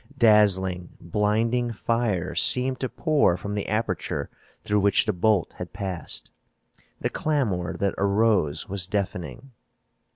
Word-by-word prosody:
Dazzling, 95 -6 +3
blinding 110 +6 0
fire 110 -6 -1
seemed 130 0 +2
to 130 - -2
pour 150 - +2
from 100 +3 -5
the 105 -1 -3
aperture 110 +2 -2 0.3
through 105 0 +1
which 100 0 +3
the 110 - 0
bolt 100 0 +1
had - - -7
passed. 95 -4 -4 0.7
The - - -1
clamor 105 - -1
that 100 -1 0
arose 100 -6 +2
was 95 -2 -3
deafening. 100 - -4
105 Hz, 125 wpm, -25 LUFS, 95-115 Hz, 0.7 s, Dazzling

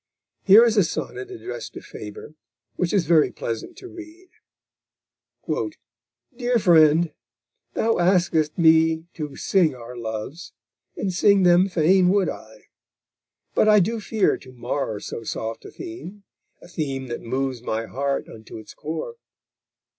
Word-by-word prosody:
Here 210 +4 +8
is 225 -2 +1
a 200 - +6
sonnet 125 -6 -5
addressed 115 +1 -7
to - - -7
Faber, 105 +7 -10 0.4
which 180 - -1
is 195 -5 +2
very 160 -1 +4
pleasant 115 -1 -5
to 380 - -10
read: 345 +1 -12 1.2
_Dear 245 -6 -4
Friend! 160 -3 +5 0.6
thou 225 -2 +1
askest 175 -4 +2
me 160 -1 +4
to 150 -3 -6
sing 175 -8 +2
our 120 0 -10
loves, 115 +8 -6 0.4
And 190 -2 -2
sing 200 +1 +4
them 180 +2 +5
fain 180 +2 +3
would 195 0 +2
I; - - -10 0.9
but 215 - +3
I 210 0 +7
do 225 +5 0
fear 215 -1 +1
To 130 - -15
mar 120 -2 -3
so 115 - -6
soft 110 0 -5
a - - -8
theme; 335 - -9 0.4
a - - -13
theme 140 -6 -4
that 120 - -5
moves 130 0 -3
My 115 -1 -3
heart 140 +3 -2
unto 110 0 -11
its 110 - -11
core. 165 - -6
165 Hz, 140 wpm, -23 LUFS, 130-200 Hz, 1.2 s, Here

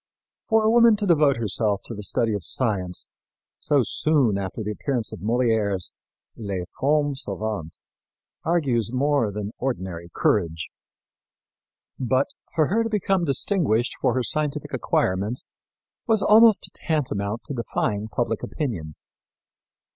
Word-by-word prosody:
For 220 -1 +4
a 215 - +4
woman 235 -1 +6
to 210 0 -2
devote 150 -7 +4
herself 105 -2 0
to - - -6
the 105 - -6
study 110 +2 0
of 100 -4 -3
science 95 -8 -2 0.5
so 145 -2 +2
soon 135 -4 +2
after 100 +3 -4
the 105 - -3
appearance 120 +1 -2
of - - -7
Molière's 110 -3 0 0.4
Les 100 -5 -4 0.2
Femmes 145 0 +1
Savantes 100 -5 -4 0.6
argued 140 -9 +1
more 140 -4 +2
than 105 0 -4
ordinary 95 -10 -3
courage. 80 -4 0 1.3
But 130 +2 +1 0.3
for 160 -2 +4
her 225 +5 +2
to 225 - -2
become 195 -4 +1
distinguished 135 - +1
for - - +2
her 130 - +1
scientific 150 +1 -2
acquirements 100 +6 0 0.6
was 220 -3 +3
almost 220 0 +6
tantamount 115 - -2
to - - -6
defying 110 -3 -2
public 115 0 -2
opinion. 90 - -4
120 Hz, 130 wpm, -24 LUFS, 105-150 Hz, 1.3 s, woman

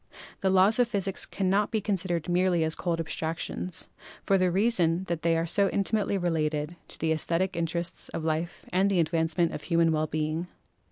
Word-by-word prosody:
The 190 - +1
Laws 190 +5 +4
of 245 - +4
Physics 195 -4 -1
cannot 195 +2 +1
be 220 - 0
considered 185 -5 -1
merely 175 -1 +2
as 160 0 0
cold 170 -1 -2
abstractions, 165 +2 -4 0.4
for 195 - +3
the 185 0 +3
reason 185 -3 +2
that 170 -3 -3
they 165 -1 +2
are 165 - 0
so 195 +4 +2
intimately 200 0 0
related 155 -3 -1
to - - -7
the 160 0 0
esthetic 170 +4 0
interests 170 +1 -3
of 160 - -5
life 160 +2 -2
and 190 +2 +2
the 190 -3 +2
advancement 165 +1 +1
of - - -5
human 165 -1 +2
well 155 0 +1
being. 155 +3 -2
170 Hz, 180 wpm, -28 LUFS, 165-190 Hz, 0.4 s, Laws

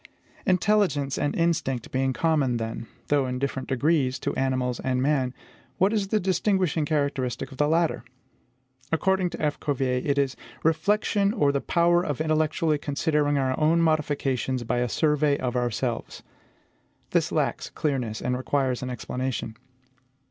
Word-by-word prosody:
Intelligence 185 -7 +2
and 145 - 0
instinct 155 -8 0
being 130 0 +1
common, 140 -3 +1
then, 115 0 -5 0.2
though 140 -2 +2
in 125 0 -2
different 135 0 -3
degrees, 135 -1 +1
to - - -3
animals 130 -2 0
and 130 -1 -1
man, 130 -2 +1 0.5
what 195 +4 +3
is 205 -3 0
the 215 +2 +1
distinguishing 185 -3 +1
characteristic 140 -4 -1
of 130 - -12
the 150 - +3
latter? 165 +1 +1 0.9
According 185 +2 +2
to - - -8
F. 150 -1 -1
Cuvier, 130 -3 0
it 145 -1 0
is 135 -2 +1 0.3
REFLECTION 200 +5 +2
OR 145 -11 +2
THE 140 -1 -1
POWER 175 0 +3
OF 145 -6 -3
INTELLECTUALLY 155 0 +1
CONSIDERING 145 0 0
OUR 130 -1 +1
OWN 160 +2 +3
MODIFICATIONS 140 -5 0
BY 120 +1 -1
A 125 0 0
SURVEY 150 +1 +2
OF 125 -1 -2
OURSELVES. 120 -3 -2 0.9
This - - +1
lacks - - -1
clearness, 125 -7 -2
and 125 - 0
requires 130 -1 0
an 130 - -4
explanation. 125 -1 -4
145 Hz, 150 wpm, -26 LUFS, 130-160 Hz, 0.9 s, what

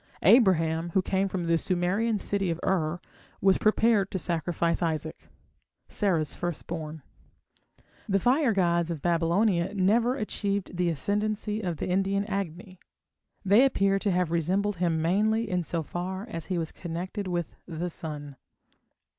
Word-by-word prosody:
Abraham, 170 -6 +4
who 190 - +4
came 195 +1 0
from 185 -2 -3
the 165 0 +2
Sumerian 195 +6 0
city 195 -1 -1
of 165 0 -2
Ur, 170 -2 0 0.4
was 195 -1 +3
prepared 215 -2 +3
to - - -3
sacrifice 170 0 -1
Isaac, 160 -2 -3 0.6
Sarah's 170 -8 0
first 175 -3 -4
born. 160 -3 -6 1.1
The 195 - +3
fire 255 - +3
gods 170 -4 +1
of 165 -4 -5
Babylonia 175 +3 +1
never 225 +6 +3
achieved 200 -5 -3
the 175 -1 +1
ascendancy 210 +6 -1
of 175 -5 -3
the - - -3
Indian 195 +2 +1
Agni; 185 -2 -5 0.7
they 205 +6 +6
appear 195 -7 +2
to 205 - 0
have 180 -3 +1
resembled 185 +4 0
him 165 -2 0
mainly 215 +6 +2
in 180 -2 0
so 165 0 -2
far 185 +6 -5
as 165 -6 -6
he 185 - -1
was 165 -1 -3
connected 185 +4 -5
with 175 -3 -3
the 170 0 -3
sun. 145 -4 -7
185 Hz, 145 wpm, -27 LUFS, 170-200 Hz, 1.1 s, they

